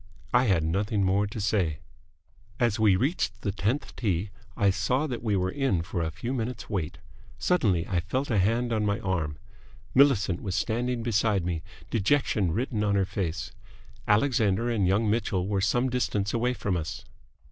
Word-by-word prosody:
I 125 +1 +5
had 95 -8 +2
nothing 100 +5 0
more 100 +2 +2
to 105 - -6
say. 95 -7 +1 0.8
As 120 -2 +1
we 105 -3 +5
reached 140 - -1
the 100 - -1
tenth 105 +9 -2
tee, 100 -3 -1 0.3
I 100 -1 +4
saw 120 +10 0
that 125 -6 -4
we 110 -3 0
were 95 -1 0
in 130 -11 0
for 85 0 -3
a 80 - -1
few 120 +10 -4
minutes' 120 -2 -3
wait. 95 -8 -3 0.4
Suddenly 100 - +1
I 90 -3 0
felt 130 +11 -2
a 105 - +3
hand 115 +5 +1
on 110 -1 +1
my 100 -1 0
arm. 80 -6 -2 0.6
Millicent 120 -10 +4
was 95 -2 -3
standing 120 +4 -1
beside 105 -4 +1
me, 85 -3 -2 0.3
dejection 110 - +2
written 110 +2 -1
on 100 -1 +2
her 100 -1 +2
face. 95 -2 -3 0.6
Alexander 115 -1 +2
and 105 -5 +1
young 105 +4 +2
Mitchell 105 -4 0
were 100 -1 0
some 120 +6 +2
distance 105 -5 -1
away 125 +2 +1
from 100 -5 -1
us. 90 +7 -5
105 Hz, 175 wpm, -27 LUFS, 95-120 Hz, 0.8 s, I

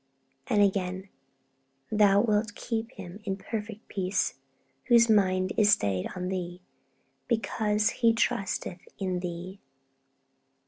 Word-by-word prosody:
And 205 -1 +4
again, 190 -1 -1 0.8
'Thou 205 -2 +5
wilt 210 -1 0
keep 225 -1 -3
him 190 0 -9
in 195 -2 -2
perfect 215 +1 -6
peace, 190 0 -1 0.5
whose 235 -2 +5
mind 185 -3 +2
is 210 -2 +5
stayed 100 - +1
on 180 0 -3
Thee, 180 -1 -4 0.7
because 215 -2 +1
he 230 -2 +3
trusteth 200 -6 -1 0.2
in 185 -2 -2
Thee.' 180 +2 -6
200 Hz, 110 wpm, -28 LUFS, 185-215 Hz, 0.8 s, Thou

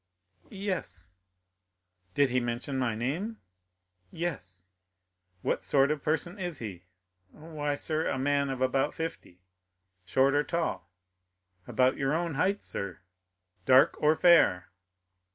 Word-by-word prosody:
"Yes." 185 - -4 1.0
"Did 140 -3 +3
he 125 - +2
mention 120 +3 -3
my 115 -4 0
name?" 165 - -3 0.7
"Yes." 95 - -5 0.8
"What - - -1
sort 140 0 +3
of 150 -2 -2
person 175 +6 -1
is 175 -4 -4
he?" 95 -7 -7 0.4
"Why, 150 - -4
sir, 155 +2 -1
a - - -1
man 140 +1 +1
of 130 -1 -4
about 135 +2 +1
fifty." 95 - -6 0.6
"Short 130 +10 +2
or 145 +1 +3
tall?" 165 - -2 0.8
"About 130 0 +2
your 135 +2 0
own 170 -1 -1
height, 195 +8 0
sir." 100 -1 -5 0.7
"Dark 130 +2 +6
or 150 +1 +4
fair?" 155 - +4
140 Hz, 120 wpm, -29 LUFS, 120-160 Hz, 1.0 s, Dark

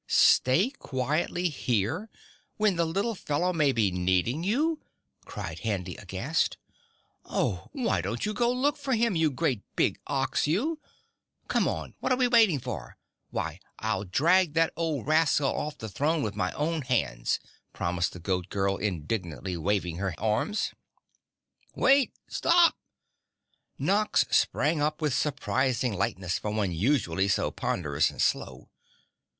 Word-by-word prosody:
"Stay 170 - +4
quietly 150 +7 -1
here 145 - -1 0.5
when 210 -3 +2
the 170 0 +1
little 200 +8 -1
fellow 180 -1 -1
may 150 -4 +3
be 110 -6 +1
needing 90 - +1
you!" 300 - +1 0.4
cried - - -6
Handy 95 -5 -3
aghast. 100 - -1 0.7
"Oh, - - -2
why 240 - 0
don't 105 +7 -3
you 210 - -1
go 235 +3 +2
look 275 +5 +1
for 280 -2 -2
him, 230 -3 +1
you 160 -1 +3
great 135 -5 -1
big - - +1
OX 135 0 0
you! 275 - 0 0.7
Come - - +1
on, - - -3
what - - -1
are 255 - +3
we 250 -1 +3
waiting 225 - +5
for? 115 - -7 0.3
Why - - -4 0.2
I'll - - -1
drag 160 - +3
that 165 0 +3
old 160 -7 -2
rascal 155 -2 +3
off 150 0 -3
the 110 - -6
throne 150 +9 0
with 105 -2 -3
my 105 - -1
own 160 +2 -1
hands," 70 - 0 0.3
promised 85 0 -1
the 90 - -9
Goat 90 0 -2
Girl 100 0 0
indignantly 90 -1 -3
waving 90 0 -1
her 95 -1 -2
arms. 110 - 0 1.0
"Wait! 270 -1 +4 0.2
Stop!" 340 0 +4 1.0
Nox 210 +2 +2
sprang 150 +1 +2
up 150 +1 0
with 150 -4 0
surprising 130 -4 0
lightness 95 -1 -1
for 105 - -3
one 105 -3 0
usually 95 - +1
so 100 - +1
ponderous 75 -3 0
and - - -12
slow. - - -1
140 Hz, 145 wpm, -28 LUFS, -, 1.0 s, waiting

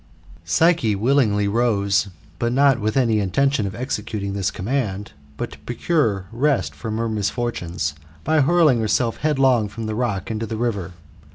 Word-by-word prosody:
Psyche 165 -11 +2
willingly 105 -2 +2
rose, 100 -3 +1 0.3
not 130 +2 +3
with 110 +3 -1
any 115 -5 +3
intention 115 +3 +1
of 95 - -6
executing 105 -5 -3
this 100 -2 0
command, 105 -2 -3 0.3
but - - -4
to - - -12
procure 120 - 0
rest 115 - 0
frohi 110 +9 -5
her 115 0 -1
misfortunes, 100 - -2 0.3
hy 155 0 +3
hurling 155 -4 +4
herself 115 +1 0
headlong 135 -7 +2
from 110 +3 -7
the 110 - -3
rock 110 -3 -2
into 110 +1 -3
the 110 - -4
river. 100 -6 -2
115 Hz, 150 wpm, -22 LUFS, 100-130 Hz, 0.3 s, hurling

